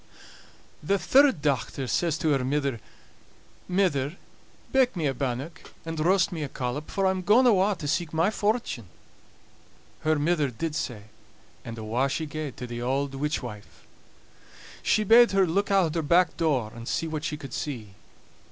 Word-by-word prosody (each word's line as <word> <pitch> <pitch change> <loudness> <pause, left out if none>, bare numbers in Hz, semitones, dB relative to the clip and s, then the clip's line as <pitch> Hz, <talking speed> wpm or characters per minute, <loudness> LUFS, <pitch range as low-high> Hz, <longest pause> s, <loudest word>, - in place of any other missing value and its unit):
The 195 +7 +1
third 265 - +4
dochter 135 -1 -1
says 165 +3 0
to 160 -2 0
her 135 -3 +2
mither: 140 -2 -1 0.9
"Mither, 175 -6 +1 0.6
bake 260 -3 +3
me 165 -4 -2
a 135 - +1
bannock, 135 +4 -4 0.2
and 165 -1 -4
roast 185 +4 +3
me 165 -3 -4
a 145 - -3
collop, 125 +5 -4
for 195 - -1
I'm 190 0 +1
gaun 215 +8 +4
awa' 205 -3 +4
to 150 - -6
seek 160 +2 -1
my 165 +5 +2
fortune." 210 - -1 1.1
Her 155 0 +1
mither 150 -1 +1
did 155 +6 -4
sae; 120 -8 -4 0.6
and 115 0 -7
awa' 115 +5 0
she 160 +3 -2
gaed 150 -2 -6
to 125 - -5
the 120 -1 -6
auld 135 +3 -1
witch 145 +2 -2
wife. 105 -4 -10 1.0
She 215 - +2
bade 230 +2 +6
her 195 -1 +4
look 195 +5 0
out 185 -5 +2
o' - - +1
her - - +1
back 170 +2 +3
door, 135 -10 0
and 115 0 -9
see - - -1
what 155 -1 -4
she 150 - -3
could 135 -4 -9
see. 115 -9 -5
155 Hz, 170 wpm, -26 LUFS, 135-185 Hz, 1.1 s, bade